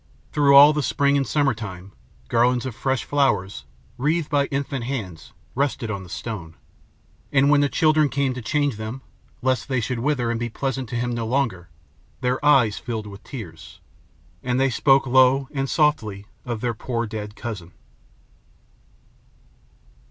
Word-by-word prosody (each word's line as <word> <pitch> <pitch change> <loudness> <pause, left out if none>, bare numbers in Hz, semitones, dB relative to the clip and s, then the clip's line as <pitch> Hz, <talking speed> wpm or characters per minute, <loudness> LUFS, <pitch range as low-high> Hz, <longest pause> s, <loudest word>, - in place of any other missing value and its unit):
Through 140 -2 +4
all 145 +2 +9
the 150 - 0
spring 140 0 +1
and 135 -2 +1
summertime, 110 -11 -2 0.4
garlands 125 - +2
of 130 - -4
fresh 130 +2 -1
flowers, 105 - 0 0.3
wreathed 155 +4 0
by 140 -2 +2
infant 140 -3 -3
hands, 100 - -5 0.2
rested 130 -4 -1
on 100 -2 -4
the 90 - -12
stone; 90 -6 -6 0.8
and, 140 0 +4
when 145 -1 +5
the 145 - +2
children 155 -1 +3
came 135 -1 0
to 125 - -6
change 145 0 0
them 110 +5 -6 0.4
lest 130 -1 0
they 130 -2 +1
should 120 +1 -2
wither 125 -2 0
and 115 - -2
be 120 0 -2
pleasant 130 0 -3
to 120 - -5
him 120 +1 -1
no 115 -1 -3
longer, 110 -9 -1 0.5
their 125 +2 -1
eyes 130 -8 +4
filled 110 -3 -5
with 100 0 -11
tears, 95 - -10 0.6
and 125 0 -1
they 135 0 +2
spoke 135 +3 +3
low 130 +1 +4
and 135 -1 -2
softly 110 -10 +1 0.2
of 120 -3 -4
their 120 -1 -1
poor 115 +1 -3
dead 105 -1 -6
cousin. 105 -8 -7
125 Hz, 160 wpm, -23 LUFS, 110-140 Hz, 0.8 s, all